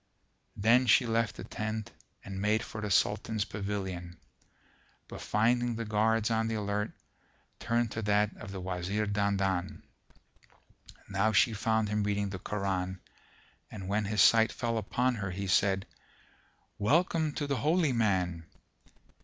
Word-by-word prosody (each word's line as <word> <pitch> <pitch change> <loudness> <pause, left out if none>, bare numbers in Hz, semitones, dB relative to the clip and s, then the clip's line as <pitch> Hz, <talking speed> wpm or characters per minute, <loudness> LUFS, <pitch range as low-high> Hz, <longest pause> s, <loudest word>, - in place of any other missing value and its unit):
Then 120 +5 +4
she 120 +3 +5
left 115 -1 0
the - - -8
tent 110 -1 -4 0.3
and 95 -1 -5
made 110 +2 +2
for 110 - -7
the 105 - -3
Sultan's 105 +2 +1
pavilion, 95 -4 -5 0.9
but - - -9
finding 120 +2 +1
the 115 0 -4
guards 110 +1 +1
on 115 0 +1
the 115 - -2
alert, 105 0 -1 0.7
turned 115 -1 0
to 110 - -3
that 105 0 +1
of 105 - -9
the 95 - -6
Wazir 95 +3 -2
Dandan. 100 -3 -1 1.2
Now 100 +2 +1
she 115 +3 +4
found 110 0 +1
him 105 0 0
reading 100 -1 -1
the 95 - -5
Koran 95 -2 -2 0.7
and 95 -4 -8
when 105 +2 0
his 105 +1 +3
sight 110 -1 +5
fell 115 -2 -2
upon 125 +4 0
her 100 -4 -4
he 100 +2 -4
said, 95 0 +2 0.9
"Welcome 160 - +2
to 145 - -2
the 140 -2 -1
Holy 155 -1 +2
Man!" 90 -7 0
105 Hz, 145 wpm, -30 LUFS, 100-115 Hz, 1.2 s, she